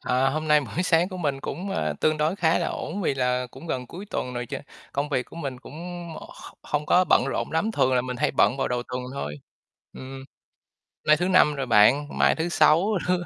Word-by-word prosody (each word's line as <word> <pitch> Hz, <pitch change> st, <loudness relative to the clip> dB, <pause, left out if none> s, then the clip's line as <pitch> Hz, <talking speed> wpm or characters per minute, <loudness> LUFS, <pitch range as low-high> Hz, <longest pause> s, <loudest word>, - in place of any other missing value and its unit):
à, 130 Hz, +1 st, +1 dB
hôm 155 Hz, +2 st, -3 dB
nay 150 Hz, 0 st, +6 dB
buổi 155 Hz, +5 st, -3 dB
sáng 170 Hz, 0 st, +3 dB
của 185 Hz, -, -7 dB
mình 145 Hz, -6 st, -2 dB
cũng, 190 Hz, +7 st, -5 dB
a, 75 Hz, -, -1 dB
tương 155 Hz, 0 st, +2 dB
đối 155 Hz, +5 st, +1 dB
khá 165 Hz, -3 st, +2 dB
là -, -, -1 dB
ổn, 180 Hz, +6 st, -5 dB
vì 145 Hz, -, +1 dB
là 125 Hz, -1 st, 0 dB
cũng 165 Hz, -, -12 dB
gần 130 Hz, -6 st, -3 dB
cuối 185 Hz, +10 st, -9 dB
tuần 125 Hz, 0 st, -3 dB
rồi, 120 Hz, 0 st, -3 dB
ch -, -, -6 dB, 0.4 s
công 140 Hz, +1 st, -1 dB
việc 130 Hz, -4 st, 0 dB
của -, -, -14 dB
mình 135 Hz, -6 st, -5 dB
cũng, 130 Hz, -, -12 dB, 0.5 s
ơ, -, -, -10 dB
kh -, -, -13 dB
hông 150 Hz, 0 st, -2 dB
có 185 Hz, -, +4 dB
bận -, -, +4 dB
rộn -, -, -2 dB
lắm, 165 Hz, +8 st, +1 dB
thường 130 Hz, -, +2 dB
là 125 Hz, -, +3 dB
mình 125 Hz, 0 st, -5 dB
hay 150 Hz, +4 st, +1 dB
bận 125 Hz, -, +3 dB
vào 135 Hz, -, -1 dB
đầu 125 Hz, -1 st, -1 dB
tuần 125 Hz, 0 st, -4 dB
thôi, 75 Hz, -, -4 dB, 0.6 s
ừm, 130 Hz, 0 st, -9 dB, 0.8 s
nay 155 Hz, 0 st, +6 dB
thứ 180 Hz, +3 st, 0 dB
Năm 180 Hz, -5 st, +4 dB
rồi 135 Hz, -1 st, -2 dB
bạn, 125 Hz, +6 st, +5 dB
mai -, -, +4 dB
thứ 165 Hz, +2 st, -2 dB
Sáu 170 Hz, +1 st, +4 dB, 0.2 s
r -, -, +2 dB
145 Hz, 240 wpm, -25 LUFS, 125-165 Hz, 0.8 s, nay